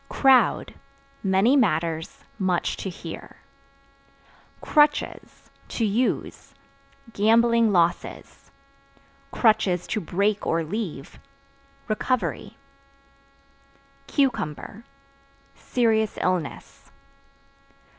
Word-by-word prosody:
Crowd 265 -2 +3 0.5
Many 195 +7 +3
matters, 165 - 0 0.2
much 185 -3 0
to 195 - -5
hear. 170 -2 -9 1.2
Crutches 295 -1 0 0.2
(To 230 - -2
use) 225 +5 -2 0.6
gambling 230 +1 +3
losses; 175 -2 -1 0.8
(to 215 -2 +1
break 200 +5 -1
or 165 0 +1
leave) 165 -5 -6 0.7
recovery. 225 -1 -2 1.5
Cucumber 230 - -2 0.7
Serious 220 -3 0
illness. 180 -5 -3
210 Hz, 65 wpm, -24 LUFS, 175-230 Hz, 1.5 s, Crowd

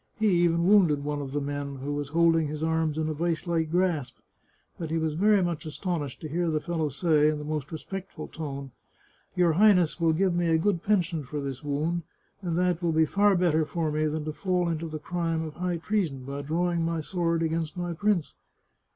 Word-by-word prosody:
He 220 -1 +2 0.2
even 170 0 +2
wounded 175 -8 +4
one 145 0 -2
of 135 -2 -6
the 145 - -1
men, 140 0 -4
who 135 +2 -4
was 145 -1 -3
holding 165 0 +3
his 150 +1 -4
arms 160 -1 0
in 160 -1 0
a 155 - -1
vice 165 +2 -1
like 165 -2 0
grasp, 160 -8 0 0.6
but 165 -2 -4
he 165 - 0
was 160 -1 0
very 200 +4 +4
much 170 -3 -2
astonished 155 -3 -4
to 155 - -5
hear 170 +3 -1
the 155 -1 +1
fellow 160 -1 -2
say, 150 +1 +3
in 155 - -1
the 150 - -6
most 150 -1 -3
respect 190 +4 -6
ful - - -7
tone: 140 -4 -6 0.3
" - - -36
Your 175 -2 +4
Highness 185 -3 +4
will 165 -1 +4
give 185 +2 +2
me 175 0 +1
a 165 -1 +4
good 175 0 +1
pension 180 -6 +1
for 145 +3 -5
this 135 -1 -5
wound, 150 +4 -1 0.4
and 170 -3 -2
that 180 -1 +1
will 170 -1 +1
be 160 0 +4
far 200 +5 +3
better 170 -3 +3
for 160 0 -2
me 155 +1 +1
than 155 0 -3
to 155 - -3
fall 180 +2 0
into 165 0 -2
the 155 -1 -5
crime 165 0 -2
of 155 -2 -6
high 180 -1 -1
treason 165 -7 -1
by 140 +1 -4
drawing 170 +3 0
my 165 -1 -1
sword 170 0 0
against 160 0 -2
my 175 -1 -2
prince." 195 -2 0
165 Hz, 220 wpm, -27 LUFS, 150-175 Hz, 0.6 s, wounded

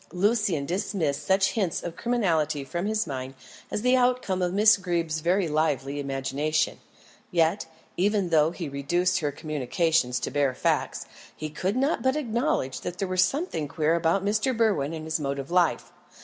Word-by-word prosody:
Lucian 190 -4 +1
dismissed 175 -4 -1
such 190 0 +3
hints 195 -8 -1
of 170 - -5
criminality 165 - 0
from 175 +7 -3
his 215 -1 0
mind 135 -3 -5 0.3
as 210 - -3
the 250 +1 +4
outcome 245 -7 +1
of 180 -1 +1
Miss 210 +3 +6
Greeb's 170 -4 -1
very 175 +3 +1
lively 145 -3 0
imagination; 140 +2 -1 0.5
yet, 170 +2 +1 0.3
even 200 0 +1
though 155 -1 +4
he 170 -1 -6
reduced 175 +7 0
her 150 -2 -1
communications 150 -2 0
to - - -3
bare 140 -3 +1
facts, - - -1 0.3
he 155 -1 -6
could 190 +6 -2
not 275 +5 +1
but 260 +1 +1
acknowledge 235 - -1
that 175 - -5
there 195 0 -2
was 185 0 +3
something 230 - -2
queer 155 +2 +1
about 170 +3 +1
Mr. 215 +4 +1
Berwin 165 -10 +1
and 155 -1 -7
his 160 0 -1
mode 140 -1 -2
of 140 +3 -6
life. 175 -2 +1
170 Hz, 170 wpm, -26 LUFS, 150-200 Hz, 0.5 s, Miss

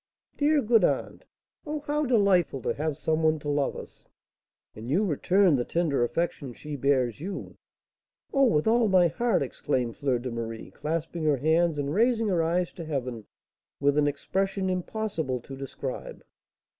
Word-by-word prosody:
"Dear, 295 -1 +2
good 225 0 +4
aunt! - - -1 0.4
Oh, 300 0 -4
how 295 0 -1
delightful 200 - +3
to - - 0
have 150 -1 -2
some 155 +1 0
one 160 0 +3
to 145 -1 -5
love 145 -1 0
us!" - - -11 0.7
"And 110 +3 -8
you 185 +10 +2
return 180 +1 +3
the 120 - 0
tender 155 -4 0
affection 140 -1 -2
she 150 -1 -7
bears 130 -3 +1
you?" 190 +3 -6 0.8
"Oh, 275 -1 +5
with 150 -11 +2
all 230 +1 +4
my 185 -3 +5
heart!" 225 +1 +1
exclaimed 125 -2 -2
Fleur 135 -3 +1
de 125 +1 -5
Marie, 115 -1 -6
clasping 165 +1 -3
her 150 -2 +3
hands, 160 +3 +2
and 145 0 -2
raising 225 +1 +2
her 175 -4 +2
eyes 175 +2 0
to 170 - -7
heaven 125 -7 -4 0.5
with 145 0 +2
an 150 -1 +3
expression 190 +6 -1
impossible 180 - -2
to 135 - -9
describe. 135 -1 -6
160 Hz, 165 wpm, -27 LUFS, 140-195 Hz, 0.8 s, Oh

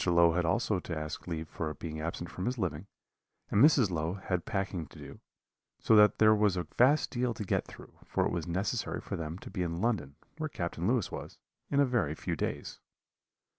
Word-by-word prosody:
Low 85 -1 +5
had 85 +1 0
also 100 +3 +1
to 85 -2 -5
ask 75 +3 -5
leave 80 -2 -3
for 75 -1 -4
being 80 -2 -6
absent 85 +1 -4
from 90 - -4
his 125 +1 -1
living, 90 -3 -2 0.6
and 105 - +5
Mrs. 135 -9 +5
Low 80 +2 -1
had 90 -3 -2
packing 95 -6 -2
to - - -16
do; - - -10 0.6
so 110 - +3
that 105 0 +6
there 110 0 +6
was 105 -3 +2
a 90 - -1
vast 140 +5 +4
deal 120 -2 0
to 110 - -4
get - - 0
through, - - -13
for - - 0
it - - 0
was 85 -2 -3
necessary 95 +4 -1
for - - -5
them 80 0 -4
to - - -10
be 95 - -3
in 85 -1 -2
London, 105 - -1 0.2
where 155 0 -2
Captain 85 - -3
Lewis 120 -4 +1
was, - - -7 0.3
in 140 - +2
a 140 - +6
very 115 - 0
few - - -3
days. - - -4
90 Hz, 210 wpm, -31 LUFS, 85-110 Hz, 0.6 s, that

